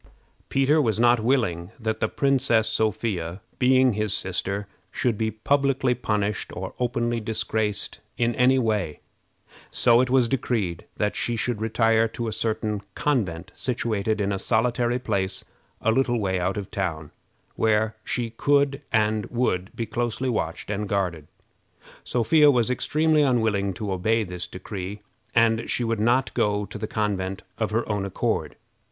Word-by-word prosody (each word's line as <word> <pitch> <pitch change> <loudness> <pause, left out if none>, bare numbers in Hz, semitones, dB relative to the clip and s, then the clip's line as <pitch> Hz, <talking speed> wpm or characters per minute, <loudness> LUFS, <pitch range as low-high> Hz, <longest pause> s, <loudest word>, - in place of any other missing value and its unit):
Peter 140 +3 +3
was 110 -5 0
not 120 0 +5
willing 110 -8 0
that 110 -1 -2
the 110 - +1
Princess 130 -5 +2
Sophia, 105 -5 -1 0.2
being 130 -1 +4
his 105 -1 0
sister, 100 +2 -2 0.3
should 120 +1 0
be 110 +1 0
publicly 135 +3 +1
punished 105 -3 -2
or - - -5
openly 120 -1 0
disgraced 110 -1 -1 0.2
in 120 0 +1
any 125 +2 +4
way, 105 - 0 0.7
so 120 0 +4
it 130 - 0
was 130 -2 +4
decreed 115 -9 -1
that 105 -1 0
she 120 - -1
should 115 -1 -2
retire 115 0 +3
to 115 +1 -5
a - - -2
certain 110 -1 -1
convent, 95 - -1
situated 110 -4 -1
in 100 0 0
a 100 - -1
solitary 120 +2 +1
place 100 -6 -2 0.4
a 110 - +2
little 120 0 +2
way 95 -3 0
out 90 +3 -1
of 100 -2 -5
town, 85 -8 -3 0.4
where 110 0 +2
she 120 -2 -2
could 140 +3 +2 0.9
be 115 - -2
closely 120 +3 -2
watched 100 -4 -2
and 105 0 -3
guarded. 90 -7 -1 0.8
Sophia 150 +5 +4
was 125 -3 +3
extremely 155 +4 +2
unwilling 110 -7 +2
to 100 +2 -4
obey 110 +5 +1
this 90 -2 -5
decree, 95 +2 -6 0.3
and 115 0 +3
she 125 - 0
would 115 -2 -1
not 120 +4 +2
go 105 0 +1
to 105 +1 -8
the 110 - -3
convent 100 -3 -2 0.2
of 110 -2 0
her 115 +2 -1
own 105 -2 -1
accord. 100 -2 -2
110 Hz, 150 wpm, -25 LUFS, 100-120 Hz, 0.9 s, not